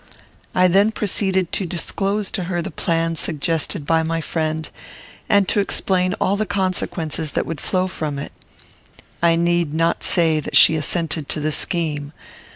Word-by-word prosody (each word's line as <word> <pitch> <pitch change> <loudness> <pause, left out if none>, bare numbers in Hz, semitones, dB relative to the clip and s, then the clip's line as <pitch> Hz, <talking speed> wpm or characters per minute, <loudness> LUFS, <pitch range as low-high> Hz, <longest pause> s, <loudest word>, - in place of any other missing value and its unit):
I 185 0 +5
then 200 +4 +4
proceeded 190 -4 0
to 190 - -1
disclose 195 +4 -2
to 185 -4 -3
her 175 0 -2
the 170 - -4
plan 165 0 -1
suggested 160 +1 -2
by 165 +1 +2
my 165 +1 -1
friend, 160 -1 -2 0.6
and 200 -2 +4
to - - +2
explain 185 -1 +1
all 195 - 0
the 215 +1 -1
consequences 170 -5 -2
that - - 0
would 165 -2 -5
flow 185 -1 0
from 155 -6 -4
it. 140 - -6 0.9
I 170 -1 +4
need 170 -2 +1
not 165 +1 +1
say 160 -3 +3
that 150 - 0
she - - +8
assented 160 -1 -1
to - - 0
the 155 +1 -1
scheme. 150 -3 -1
170 Hz, 165 wpm, -20 LUFS, 160-185 Hz, 0.9 s, she